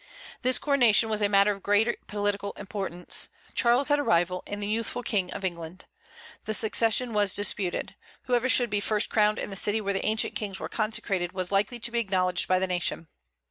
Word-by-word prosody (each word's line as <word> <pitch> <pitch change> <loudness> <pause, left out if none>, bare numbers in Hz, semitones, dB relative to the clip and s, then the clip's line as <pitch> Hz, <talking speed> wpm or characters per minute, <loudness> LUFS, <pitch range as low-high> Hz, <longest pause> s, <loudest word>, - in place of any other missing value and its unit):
This 255 0 +3
coronation 240 -6 +3
was 215 -1 -1
a 205 - +2
matter 200 0 +4
of 200 -1 -6
great 205 +4 +1
political 205 -1 -2
importance. 195 -3 -2 0.2
Charles 245 +4 +2
had 290 0 +3
a - - 0
rival 175 -3 +1
in 205 - -5
the 205 - -3
youthful 230 +3 -2
King 190 -6 -1
of 195 - -5
England. 170 0 -6 0.6
The 215 - 0
succession 225 +2 +1
was 205 -2 +1
disputed. 205 -3 0 0.3
Whoever 250 0 0
should 245 -4 +3
first 215 0 0
be - - -13
crowned 210 -1 +3
in - - -5
the - - -6
city 205 +3 +1
where 200 -2 -2
the 195 - -2
ancient 220 0 0
kings 200 -2 -4
were - - -5
consecrated 195 -5 -1
was 185 -1 -4
likely 205 +5 +1
to 235 - -3
be 235 - 0
acknowledged 185 -4 0
by 185 - +3
the 185 - 0
nation. 175 -3 -3
205 Hz, 200 wpm, -27 LUFS, 190-225 Hz, 0.6 s, matter